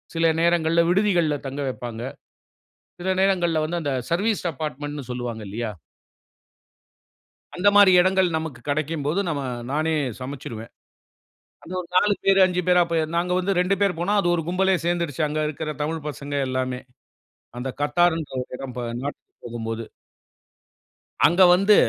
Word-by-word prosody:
சில 165 Hz, 0 st, +3 dB
நேரங்கள்ல 170 Hz, -1 st, +3 dB
விடுதிகள்ல 175 Hz, -6 st, +2 dB
தங்க 140 Hz, +2 st, -4 dB
வப்பாங்க. 120 Hz, -3 st, -6 dB, 1.0 s
சில 180 Hz, -, -3 dB
நேரங்கள்ல 175 Hz, -5 st, +2 dB
வந்து 170 Hz, +2 st, -2 dB
அந்த 145 Hz, -2 st, -1 dB, 0.2 s
சர்வீஸ் 205 Hz, +5 st, +1 dB
அப்பாட்மட்டுன்னு 145 Hz, -2 st, -5 dB
சொல்வாங்க 120 Hz, -3 st, -4 dB
இல்லையா? 110 Hz, +2 st, -3 dB, 1.9 s
அந்த 180 Hz, +3 st, +1 dB
மாரி 205 Hz, -2 st, +8 dB
இடங்கள் 185 Hz, 0 st, +3 dB
நமக்கு 160 Hz, -6 st, -5 dB
கிடைக்கும்போது, 155 Hz, +3 st, -1 dB
நம்ம, 145 Hz, -3 st, -2 dB, 0.3 s
நானே 155 Hz, +2 st, 0 dB, 0.3 s
சமைச்சிருவேன். 125 Hz, -4 st, -7 dB, 0.9 s
அது 180 Hz, -, -9 dB
ஒரு 175 Hz, -, -6 dB
4 205 Hz, +3 st, +5 dB
பேர் 195 Hz, 0 st, +5 dB
5 180 Hz, -1 st, 0 dB
பேரா 180 Hz, -1 st, +5 dB
போயிருந்தோம். 165 Hz, -1 st, -1 dB
நாங்க 175 Hz, +1 st, 0 dB
வந்து 190 Hz, +2 st, 0 dB
2 180 Hz, +2 st, +2 dB
பேரு 200 Hz, -2 st, +3 dB
போனோம். 205 Hz, +4 st, +2 dB
அது 195 Hz, -, +1 dB
ஒரு 165 Hz, -, -2 dB
கும்பலே 190 Hz, +1 st, +2 dB
சேர்ந்துருச்சு. 170 Hz, -4 st, -1 dB
அங்க 150 Hz, +1 st, -2 dB
இருக்குற 155 Hz, 0 st, -4 dB
தமிழ் 155 Hz, 0 st, -3 dB
பசங்க 145 Hz, 0 st, -5 dB
எல்லாமே. 130 Hz, -1 st, -2 dB, 0.8 s
அந்த 125 Hz, +2 st, -4 dB
"Qatar" 175 Hz, +4 st, +3 dB
ங்கிற 150 Hz, -, -8 dB
ஒரு -, -, -12 dB
இடம் 130 Hz, -1 st, -7 dB
ப -, -, -1 dB, 0.2 s
நாட்டுக்கு 145 Hz, +1 st, -7 dB
போகும்போது. 115 Hz, -1 st, -4 dB, 1.4 s
அங்க 175 Hz, +3 st, +5 dB
வந்து 195 Hz, +3 st, +5 dB
160 Hz, 145 wpm, -23 LUFS, 140-180 Hz, 1.9 s, மாரி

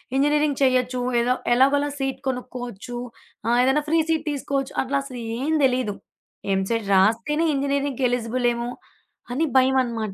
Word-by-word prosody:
Engineering 295 Hz, +1 st, +2 dB
చేయొచ్చు. 255 Hz, -1 st, +2 dB, 0.2 s
ఏదో 245 Hz, +2 st, +2 dB, 0.2 s
ఎలాగోలా 280 Hz, +3 st, +3 dB
సీట్ 270 Hz, -1 st, -2 dB
కొనుక్కోవచ్చు. 245 Hz, -2 st, -5 dB, 0.5 s
ఆహ్, 235 Hz, +1 st, +2 dB
ఏదైనా 265 Hz, +4 st, +2 dB
ఫ్రీ 325 Hz, +1 st, +3 dB
సీట్ 320 Hz, -1 st, 0 dB
తీసుకోవచ్చు. 275 Hz, -1 st, -2 dB
అట్లా 275 Hz, +1 st, 0 dB
అసలు 255 Hz, -3 st, -8 dB, 0.2 s
ఏం 295 Hz, +5 st, -1 dB
తెలీదు. 250 Hz, -6 st, +1 dB, 0.6 s
ఎంసెట్ 200 Hz, +2 st, -1 dB
రాస్తేనే 230 Hz, +11 st, +2 dB
ఇంజినీరింగ్‌కి 275 Hz, -1 st, -1 dB
ఎలిజిబుల్ 245 Hz, 0 st, 0 dB
ఏమో, 235 Hz, 0 st, -4 dB, 0.6 s
అని 315 Hz, +5 st, +1 dB
భయమనమాట. 245 Hz, -5 st, +1 dB
255 Hz, 130 wpm, -23 LUFS, 240-280 Hz, 0.6 s, ఎలాగోలా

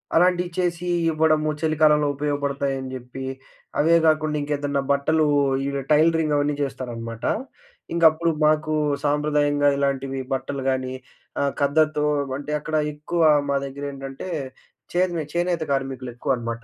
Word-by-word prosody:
అలాంటియి 180 Hz, +1 st, +3 dB
చేసీ 175 Hz, -1 st, -1 dB, 0.2 s
ఇవ్వడము, 155 Hz, -1 st, +2 dB
చలికాలంలో 155 Hz, -2 st, +3 dB
ఉపయోగపడతాయని 140 Hz, -2 st, -2 dB
జెప్పి. 130 Hz, +1 st, -7 dB, 0.5 s
అవే 165 Hz, +3 st, +5 dB
గాకుండ 155 Hz, -1 st, +2 dB
ఇంకేదన్నా 145 Hz, -1 st, -1 dB
బట్టలూ 155 Hz, +3 st, +2 dB, 0.4 s
ఈ -, -, -1 dB
వె 140 Hz, -, -1 dB
టైలరింగ్ 160 Hz, 0 st, +3 dB
అవన్నీ 145 Hz, 0 st, +1 dB
జేస్తారనమాట. 120 Hz, -4 st, -5 dB, 0.7 s
ఇంగప్పుడు 165 Hz, 0 st, +4 dB
మాకూ 155 Hz, 0 st, +2 dB, 0.3 s
సాంప్రదాయంగా 145 Hz, 0 st, +2 dB
ఇలాంటివి 135 Hz, -1 st, -1 dB
బట్టలు 135 Hz, +1 st, -3 dB
గానీ, 130 Hz, -1 st, -1 dB, 0.5 s
ఆహ్, 140 Hz, 0 st, +1 dB
ఖద్దరుతో 150 Hz, +1 st, +2 dB, 0.3 s
అంటే, 145 Hz, +1 st, -6 dB
అక్కడ 155 Hz, +1 st, -4 dB, 0.2 s
ఎక్కువా 160 Hz, +2 st, +1 dB, 0.2 s
మా 140 Hz, -, +2 dB
దగ్గరేంటంటే, 135 Hz, +2 st, -6 dB, 0.6 s
చే‌ద్ 180 Hz, 0 st, +1 dB
మే 160 Hz, -, -1 dB
చేనేత 175 Hz, -1 st, 0 dB
కార్మికులెక్కువనమాట. 125 Hz, -3 st, -2 dB
145 Hz, 115 wpm, -23 LUFS, 135-155 Hz, 0.7 s, అవే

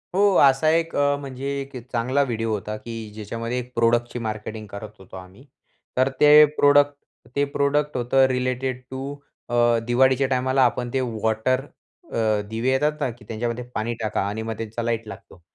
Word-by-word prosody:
हो, 200 Hz, -1 st, +4 dB
असा 135 Hz, +3 st, +4 dB
एक 165 Hz, +1 st, +1 dB
अ, 145 Hz, 0 st, +2 dB
म्हणजे 135 Hz, -1 st, -6 dB
एक 135 Hz, 0 st, -10 dB, 0.2 s
चांगला 130 Hz, +4 st, +1 dB
व्हिडिओ 115 Hz, -3 st, -2 dB
होता, 105 Hz, 0 st, -3 dB
की 115 Hz, 0 st, -7 dB
ज्याच्यामध्ये 115 Hz, +3 st, -4 dB
एक 125 Hz, 0 st, -8 dB
प्रोडक्टची 120 Hz, +1 st, +1 dB
मार्केटिंग 110 Hz, 0 st, -5 dB
करत 100 Hz, +2 st, -8 dB
होतो 95 Hz, 0 st, -13 dB
आम्ही. 95 Hz, +8 st, -13 dB, 0.5 s
तर 130 Hz, +1 st, +3 dB
ते 150 Hz, -, +6 dB, 0.3 s
प्रोडक्ट 145 Hz, 0 st, +5 dB, 0.4 s
ते 140 Hz, -, +2 dB
प्रोडक्ट 145 Hz, +1 st, +1 dB
होतं 125 Hz, +2 st, +3 dB
रिलेटेड 130 Hz, 0 st, -2 dB
टू 135 Hz, +2 st, -5 dB, 0.3 s
अ, 120 Hz, -, -1 dB, 0.3 s
दिवाळीच्या 130 Hz, +2 st, +3 dB
टायमाला 130 Hz, +1 st, +2 dB
आपण 120 Hz, +1 st, -1 dB
ते 135 Hz, -, +1 dB
वॉटर 115 Hz, +2 st, 0 dB, 0.5 s
अ, 110 Hz, -2 st, +1 dB
दिवे 115 Hz, +3 st, -1 dB
येतात 150 Hz, +3 st, +1 dB
ना, -, -, +1 dB
की 115 Hz, -2 st, -16 dB
त्यांच्यामध्ये 120 Hz, +2 st, -3 dB
पाणी 115 Hz, +2 st, -1 dB
टाका 110 Hz, -2 st, -1 dB
आणि 105 Hz, +2 st, -3 dB
मग 110 Hz, 0 st, -4 dB
त्यांचा 115 Hz, +1 st, -4 dB
लाईट 115 Hz, -1 st, -2 dB
लागतो. 90 Hz, -, -12 dB
125 Hz, 170 wpm, -23 LUFS, 110-135 Hz, 0.5 s, ते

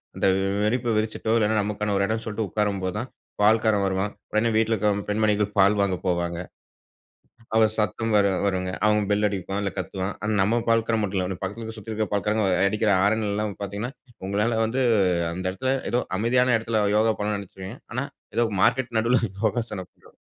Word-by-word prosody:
அந்த -, -, +1 dB, 0.3 s
விரிப்ப 115 Hz, +2 st, +1 dB
விரிச்சிட்டோ 110 Hz, +1 st, -1 dB
இல்லன்னா, 110 Hz, 0 st, +2 dB
நமக்கான 105 Hz, 0 st, -2 dB
ஒரு 100 Hz, -, +2 dB
இடம் 110 Hz, 0 st, -1 dB
சொல்லிட்டு 110 Hz, 0 st, -2 dB
உட்காரும்போதான், 105 Hz, +2 st, -2 dB, 0.3 s
பால்காரன் 110 Hz, -1 st, +4 dB
வருவான். 95 Hz, +2 st, -1 dB, 0.2 s
உடனே 110 Hz, +2 st, +2 dB
வீட்ல 115 Hz, 0 st, +2 dB
இருக்கிற 105 Hz, 0 st, +2 dB, 0.2 s
பெண்மணிகள் 105 Hz, -1 st, +1 dB
பால் 100 Hz, +2 st, +5 dB
வாங்க 95 Hz, -2 st, +1 dB
போவாங்க. 85 Hz, -1 st, 0 dB, 1.1 s
அவுங்க 110 Hz, -1 st, +5 dB
சத்தம் 110 Hz, +1 st, 0 dB
வேற 100 Hz, -1 st, +5 dB, 0.2 s
வருங்க. 95 Hz, -2 st, 0 dB, 0.2 s
அவுங்க 105 Hz, -1 st, +3 dB
பெல் 105 Hz, +1 st, +2 dB
அடிப்பான். 100 Hz, 0 st, -3 dB
இல்ல 100 Hz, -, -1 dB
கத்துவான். 95 Hz, +1 st, -3 dB
ஆனா 105 Hz, +1 st, -1 dB
நம்ம 115 Hz, +4 st, +2 dB
பால்க்காரன் 115 Hz, -1 st, +2 dB
மட்டும் 95 Hz, -1 st, -1 dB
இல்ல. 90 Hz, 0 st, -3 dB
பக்கத்தில 110 Hz, +3 st, -5 dB
சுத்தி 110 Hz, +1 st, -8 dB
இருக்க 110 Hz, -1 st, -1 dB
பால்காரங்க 105 Hz, +1 st, +1 dB, 0.2 s
அடிக்கிற 105 Hz, +1 st, +1 dB
ஆரன் 110 Hz, +1 st, +1 dB
எல்லாம் 105 Hz, -1 st, -2 dB
பார்த்தீங்கன்னா, 100 Hz, +6 st, -4 dB, 0.4 s
உங்களால 110 Hz, +3 st, 0 dB
வந்து 125 Hz, +4 st, -1 dB, 0.5 s
அந்த 95 Hz, +1 st, -5 dB
இடத்தில 130 Hz, +8 st, -1 dB, 0.2 s
ஏதோ 125 Hz, -, +2 dB, 0.2 s
அமைதியான 125 Hz, +3 st, +3 dB
இடத்தில 115 Hz, -1 st, -1 dB, 0.2 s
யோகா 110 Hz, 0 st, +3 dB
பண்ண 105 Hz, 0 st, -1 dB
நினைச்சிருப்பீங்க. 95 Hz, +3 st, -9 dB
ஆனா 125 Hz, +3 st, -1 dB, 0.3 s
ஏதோ 120 Hz, -, +3 dB, 0.2 s
மார்க்கெட் 120 Hz, -3 st, +1 dB
நடுவுல 120 Hz, +3 st, +2 dB, 0.2 s
யோகாசனம் 105 Hz, -4 st, -2 dB
பண்ற -, -, -22 dB
105 Hz, 165 wpm, -24 LUFS, 100-115 Hz, 1.1 s, பால்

